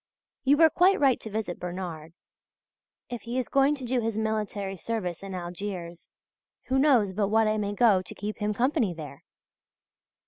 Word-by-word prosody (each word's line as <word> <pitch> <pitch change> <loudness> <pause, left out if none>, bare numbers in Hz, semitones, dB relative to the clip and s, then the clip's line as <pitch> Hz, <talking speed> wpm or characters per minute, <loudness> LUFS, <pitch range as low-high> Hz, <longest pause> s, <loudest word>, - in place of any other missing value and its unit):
You 285 +2 +4
were 320 0 +6
quite 380 +3 +4
right 270 -3 +4
to 220 - -7
visit 210 -4 -4
Bernard. 175 -3 -6 1.0
If 240 - -4
he 240 +2 -4
is 255 - -1
going 275 +2 +3
to 265 -3 -7
do 245 0 0
his 225 -1 -2
military 210 -3 -2
service 185 -4 -4
in 195 -1 -6
Algiers 175 -1 -6 0.6
who 265 +1 +2
knows 250 -9 +4
but 200 +1 0
what 220 +2 +3
I 215 0 +1
may 205 -1 -2
go 210 -5 +4
to 180 - -9
keep 210 +2 -5
him 210 0 0
company 235 - +1
there. 155 -3 -9
215 Hz, 175 wpm, -27 LUFS, 185-245 Hz, 1.0 s, were